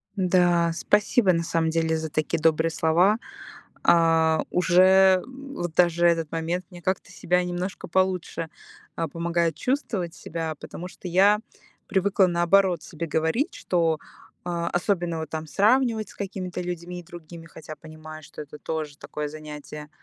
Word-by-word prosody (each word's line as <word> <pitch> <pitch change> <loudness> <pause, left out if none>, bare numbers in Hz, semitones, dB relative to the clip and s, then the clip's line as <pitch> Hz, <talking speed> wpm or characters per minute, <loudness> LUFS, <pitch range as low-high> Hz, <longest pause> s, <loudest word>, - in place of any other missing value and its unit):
Да, 175 -3 +3
спасибо, 205 +2 +2
на 165 0 0
самом 165 -1 0
деле, 160 0 +1
за 160 0 -4
такие 155 +2 -1
добрые 160 +1 +2
слова. 170 +7 +3 0.7
А. 165 -1 +4
Уже, 185 +1 +5
м, 275 +2 -11
вот 175 -2 -4
даже 175 -1 +3
этот 165 -2 +1
момент 165 +2 -2
мне 175 -1 -11
как-то 185 0 -2
себя 180 0 0
немножко 180 +2 -4
получше, 185 -3 -1 0.5
а, 165 - -2
помогает 170 0 -1
чувствовать 210 - -2
себя, 160 -1 -5
потому 180 - -8
что 185 - -10
я 195 +4 +4 0.5
привыкла, 190 0 +3
наоборот, 175 0 +3
себе 165 +2 -6
говорить, 160 - 0
что, 165 -3 0 0.5
а, 170 -1 -2
особенно 175 -2 -1
вот 160 -2 -5
там 160 0 -5
сравнивать 220 - +2
с - - -15
какими-то 185 -3 -5
людьми 175 0 -5
и - - -18
другими, 170 -1 -11
хотя 155 -1 -10
понимаю, 155 0 -11
что - - -10
это 150 0 -10
тоже 155 -2 -4
такое 150 0 -5
занятие, 150 0 -9
170 Hz, 150 wpm, -25 LUFS, 160-185 Hz, 0.7 s, Уже